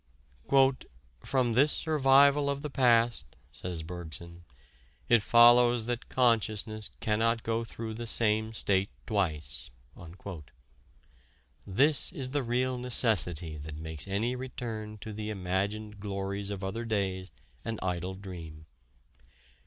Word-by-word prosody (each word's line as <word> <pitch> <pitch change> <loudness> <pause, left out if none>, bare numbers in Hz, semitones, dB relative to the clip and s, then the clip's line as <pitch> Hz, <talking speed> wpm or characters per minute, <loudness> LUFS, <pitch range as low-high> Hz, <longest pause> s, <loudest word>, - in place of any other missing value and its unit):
"From 125 -3 +1
this 140 +5 +4
survival 140 -1 +4
of 140 +1 -3
the 150 - -4
past," 120 -3 +2 0.2
says 85 -3 -5
Bergson, 85 0 -7 0.6
"it 120 -2 +5
follows 120 +1 +6
that 120 0 -4
consciousness 110 -3 +1
cannot 115 +1 +1
go 115 0 -1
through 115 -1 -6
the 115 +1 -6
same 110 -1 +1
state 100 -2 +1 0.2
twice." 85 - -1 2.0
This 140 +10 +3
is 135 -7 -3
the 145 0 0
real 125 +1 -1
necessity 90 - +1
that 75 +1 -8
makes 80 +2 -4
any 110 +6 -1
return 115 -4 -6
to 110 - -7
the 105 +1 -5
imagined 100 +2 -3
glories 100 0 -3
of 100 -1 -5
other 110 +5 -3
days 95 -4 -2 0.3
an 115 -1 -4
idle 90 0 -2
dream. 85 -5 -9
110 Hz, 115 wpm, -29 LUFS, 95-120 Hz, 2.0 s, follows